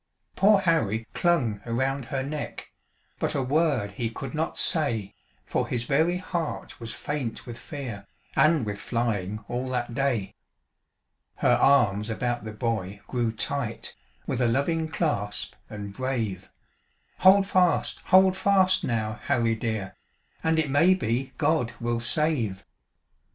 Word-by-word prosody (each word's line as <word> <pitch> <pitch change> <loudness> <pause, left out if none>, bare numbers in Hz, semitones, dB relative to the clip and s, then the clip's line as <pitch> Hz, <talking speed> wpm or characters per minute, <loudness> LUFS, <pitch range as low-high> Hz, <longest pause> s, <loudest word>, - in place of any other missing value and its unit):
Poor 200 0 +5
Harry 115 - +1
clung 125 - +1
around 130 +3 -1
her 130 +1 -2
neck, 145 +2 -6 0.5
But - - 0
a 135 - +1
word 145 -6 +1
he 115 +3 -2
could 125 +3 -7
not 160 +1 -2
say, 120 - 0 0.3
For - - -1
his 120 -1 -1
very 160 +7 +2
heart 175 -3 -4
was 115 -1 -6
faint 145 -6 -4
with 120 -1 -8
fear, 120 - -7 0.3
And 155 -2 +4
with 100 -1 -4
flying 110 -3 -2
all 125 +2 -3
that 120 -2 -2
day. 125 -7 0 1.0
Her - - +3
arms 105 -6 +4
about 120 0 -2
the 110 - -5
boy 105 -3 -3
grew 120 -3 -1
tight, 110 - -3 0.3
With 125 - -2
a 120 - +4
loving 160 +7 +1
clasp, 145 - -2 0.2
and 100 -2 -7
brave; 110 -6 -3 0.7
"Hold 195 +1 +7
fast! 180 -3 +2
Hold 190 0 +6
fast, 190 -1 +3
now, 110 -4 -1
Harry 115 -1 +2
dear, 110 -4 -3 0.5
And 160 0 +2
it 155 -3 +1
may 165 +7 +5
be 130 -5 -1
God 150 -6 +1
will 120 0 -1
save." 120 -6 0
125 Hz, 140 wpm, -26 LUFS, 110-155 Hz, 1.0 s, Hold